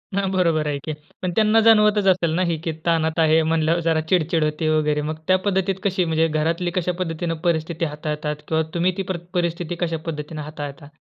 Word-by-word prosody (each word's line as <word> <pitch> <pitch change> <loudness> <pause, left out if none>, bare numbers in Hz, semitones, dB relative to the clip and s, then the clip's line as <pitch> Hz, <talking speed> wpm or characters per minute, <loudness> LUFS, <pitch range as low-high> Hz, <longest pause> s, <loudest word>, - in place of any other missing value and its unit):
हां, 195 -1 0
बरोबर 165 -5 +1
आहे 145 -1 -1
की. 155 - -3 0.3
पण 180 -1 -1
त्यांना 220 0 +4
जाणवतच 210 -2 +5
असेल 175 -3 +3
ना, 185 - +1
ही 160 - -1
की 165 - -1
ताणात 160 -1 +1
आहे 160 0 +4
म्हणल्यावर, 165 +1 +2
जरा 160 -1 +2
चिडचिड 165 -3 +2
होते 155 +1 0
वगैरे. 150 -1 +1
मग 155 - -4
त्या 185 0 +5
पद्धतीत 190 0 +1
कशी 190 -2 +1
म्हणजे 160 0 +2
घरातली 165 +3 -1
कशापद्धतीने 175 -2 -2
परिस्थिती 165 -1 0
हाताळतात 150 0 -3
किंवा 160 0 +1
तुम्ही 175 +2 +2
ती 195 - -1
प्रत 175 -1 -5
परिस्थिती 175 -1 -1
कशापद्धतीने 160 -2 -4
हाताळता? 145 -1 -7
165 Hz, 185 wpm, -22 LUFS, 155-180 Hz, 0.3 s, जाणवतच